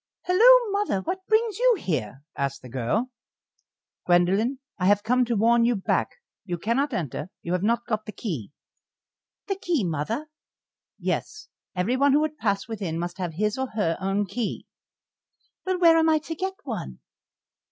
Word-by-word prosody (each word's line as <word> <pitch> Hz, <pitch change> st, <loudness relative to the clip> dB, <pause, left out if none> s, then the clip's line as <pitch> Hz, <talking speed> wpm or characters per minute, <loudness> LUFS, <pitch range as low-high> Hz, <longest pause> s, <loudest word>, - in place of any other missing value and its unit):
"Halloo, 460 Hz, +5 st, +6 dB
mother, 400 Hz, -, 0 dB
what 375 Hz, -, -4 dB
brings 440 Hz, -1 st, +2 dB
you -, -, +5 dB
here?" 135 Hz, -, -3 dB
asked 140 Hz, -1 st, -3 dB
the 125 Hz, -, -10 dB
girl. 135 Hz, -, -1 dB, 1.0 s
"Gwendoline, 190 Hz, +9 st, +3 dB, 0.2 s
I 180 Hz, -, +2 dB
have 205 Hz, 0 st, +4 dB
come 250 Hz, +3 st, +2 dB
to 235 Hz, 0 st, -1 dB
warn 230 Hz, +3 st, +4 dB
you 240 Hz, +1 st, +3 dB
back. 195 Hz, -, 0 dB, 0.3 s
You 175 Hz, -3 st, -3 dB
cannot 235 Hz, -, 0 dB
enter; 175 Hz, -, -3 dB
you 170 Hz, -, -4 dB
have 180 Hz, -, 0 dB
not 235 Hz, +3 st, +1 dB
got 215 Hz, -2 st, -3 dB
the -, -, -4 dB
key." 160 Hz, -, -5 dB, 0.9 s
"The 390 Hz, -1 st, -2 dB
key, 330 Hz, -10 st, +1 dB
mother?" 175 Hz, -, -2 dB, 0.7 s
"Yes, 425 Hz, 0 st, -3 dB, 0.3 s
everyone 255 Hz, +10 st, +2 dB
who 295 Hz, -, +4 dB
would 305 Hz, -1 st, -2 dB
pass 200 Hz, -2 st, 0 dB
within 195 Hz, -8 st, -4 dB
must 175 Hz, +2 st, -4 dB
have 175 Hz, -4 st, -3 dB
his 210 Hz, +6 st, 0 dB
or 265 Hz, -, -1 dB
her 165 Hz, -7 st, +1 dB
own 195 Hz, +2 st, 0 dB
key." 230 Hz, +3 st, -4 dB, 1.0 s
"Well, 370 Hz, -1 st, +1 dB
where 335 Hz, -2 st, +6 dB
am 320 Hz, 0 st, +3 dB
I 315 Hz, -, +4 dB
to 315 Hz, +2 st, -5 dB
get 380 Hz, +4 st, -3 dB
one?" -, -, -5 dB
225 Hz, 165 wpm, -25 LUFS, -, 1.0 s, Halloo